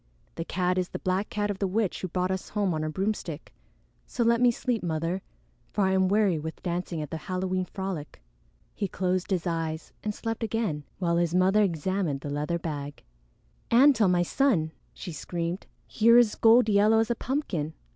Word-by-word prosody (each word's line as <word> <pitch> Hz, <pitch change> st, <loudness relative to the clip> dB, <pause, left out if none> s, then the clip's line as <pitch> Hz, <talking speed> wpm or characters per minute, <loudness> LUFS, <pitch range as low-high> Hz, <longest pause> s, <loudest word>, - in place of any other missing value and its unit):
The 165 Hz, -, -4 dB
cat 180 Hz, 0 st, 0 dB
is 180 Hz, -, -2 dB
the -, -, -5 dB
black 185 Hz, +2 st, -1 dB
cat 205 Hz, 0 st, -1 dB
of 195 Hz, -, -6 dB
the 195 Hz, -, +1 dB
witch 200 Hz, 0 st, -1 dB
who 185 Hz, -, -2 dB
brought 180 Hz, +1 st, -1 dB
us 190 Hz, 0 st, -3 dB
home 200 Hz, -4 st, 0 dB
on 155 Hz, -, -2 dB
her 155 Hz, -, -2 dB
broomstick; 175 Hz, -3 st, -3 dB, 0.5 s
so 240 Hz, -, -1 dB
let 235 Hz, +1 st, +3 dB
me 245 Hz, -, +6 dB
sleep, 240 Hz, -1 st, -1 dB
Mother, 165 Hz, +2 st, -2 dB, 0.5 s
for 205 Hz, -, 0 dB
I 190 Hz, -, +2 dB
am 190 Hz, 0 st, +3 dB
weary 200 Hz, -4 st, +2 dB
with 160 Hz, +1 st, -7 dB
dancing 175 Hz, -2 st, -2 dB
at 150 Hz, -, -9 dB
the 160 Hz, -, -3 dB
Halloween 185 Hz, 0 st, -1 dB
frolic." 185 Hz, -, -5 dB, 0.5 s
He 200 Hz, -, -2 dB
closed 185 Hz, 0 st, -1 dB
his 185 Hz, -4 st, 0 dB
eyes 165 Hz, -2 st, -3 dB
and 210 Hz, -1 st, -2 dB
slept 225 Hz, 0 st, -4 dB
again, 215 Hz, -10 st, -2 dB
while 170 Hz, -2 st, +1 dB
his 170 Hz, 0 st, +1 dB
mother 190 Hz, +3 st, +4 dB
examined 175 Hz, -4 st, 0 dB
the 145 Hz, -, -5 dB
leather 150 Hz, +4 st, -1 dB
bag. 145 Hz, -4 st, -6 dB, 0.7 s
"Antone, 240 Hz, -4 st, +6 dB
my 175 Hz, -1 st, +3 dB
son!" 180 Hz, -, +1 dB, 0.2 s
she 180 Hz, -, -7 dB
screamed. 170 Hz, +3 st, -4 dB, 0.2 s
"Here 230 Hz, +2 st, +5 dB
is 235 Hz, -3 st, +5 dB
gold 230 Hz, +1 st, +5 dB
yellow 210 Hz, +1 st, +4 dB
as 225 Hz, +1 st, +2 dB
a -, -, +1 dB
pumpkin! 205 Hz, -, -2 dB
185 Hz, 190 wpm, -27 LUFS, 165-210 Hz, 0.7 s, me